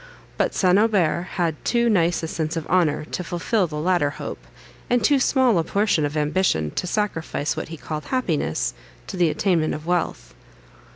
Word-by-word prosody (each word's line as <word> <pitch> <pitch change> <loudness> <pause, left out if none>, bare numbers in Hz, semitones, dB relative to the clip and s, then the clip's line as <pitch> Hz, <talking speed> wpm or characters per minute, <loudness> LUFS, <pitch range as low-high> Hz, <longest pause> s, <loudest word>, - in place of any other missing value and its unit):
But - - 0
St. 185 0 +4
Aubert 195 -6 +2
had 165 -5 -1
too 235 -1 +2
nice 175 -6 +2
a - - -1
sense 160 0 -3
of 160 - -3
honour 160 -4 +1
to 180 - -4
fulfil 180 +3 0
the 150 - -7
latter 160 -1 +1
hope, 145 - -7 0.5
and 245 -1 +2
too 285 -2 +4
small 255 -7 +3
a - - +1
portion 200 -4 +1
of 145 +1 -3
ambition 150 - +1
to - - -3
sacrifice 165 -7 -2
what - - -4
he 165 - -8
called 155 0 -6
happiness, 155 - -1 0.3
to - - -7
the 175 -3 +3
attainment 165 -2 +1
of 150 - -8
wealth. 170 - -2
170 Hz, 180 wpm, -23 LUFS, 155-200 Hz, 0.5 s, St